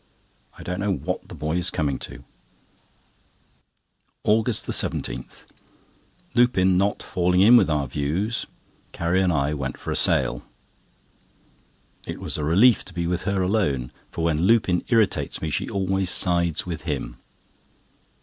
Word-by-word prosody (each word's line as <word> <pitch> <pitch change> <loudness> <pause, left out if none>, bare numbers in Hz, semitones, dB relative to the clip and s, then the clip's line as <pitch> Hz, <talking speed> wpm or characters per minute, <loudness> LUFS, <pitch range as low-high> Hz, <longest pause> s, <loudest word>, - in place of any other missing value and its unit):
I - - -10
don't 90 +1 -4
know 100 0 0
what 85 +7 -5
the - - -8
boy 80 +3 -2
is 90 +1 +1
coming 70 -5 -2
to. - - -9 2.0
AUGUST 110 +1 +1
17.—Lupin 105 -7 -2
not 100 +2 0
falling 90 +1 +1
in 115 +5 +8
with 120 - +5
our 75 -3 0
views, 80 - -2 0.5
Carrie 85 +3 +1
and 90 -1 +2
I 70 -1 0
went 65 -4 -4
for - - -6
a - - -1
sail. - - +2 1.7
It - - -5
was - - -4
a - - -2
relief 100 +10 +4
to 90 - -9
be 85 -1 -2
with 90 0 -1
her 100 -1 0
alone; 80 - 0 0.2
for 85 - -5
when 80 -2 +1
Lupin 95 -2 +3
irritates 115 -4 +1
me, 80 - -3
she - - -2
always 95 -1 0
sides 85 -3 +1
with 85 -4 -5
him. 70 -6 -4
90 Hz, 140 wpm, -24 LUFS, 75-100 Hz, 2.0 s, in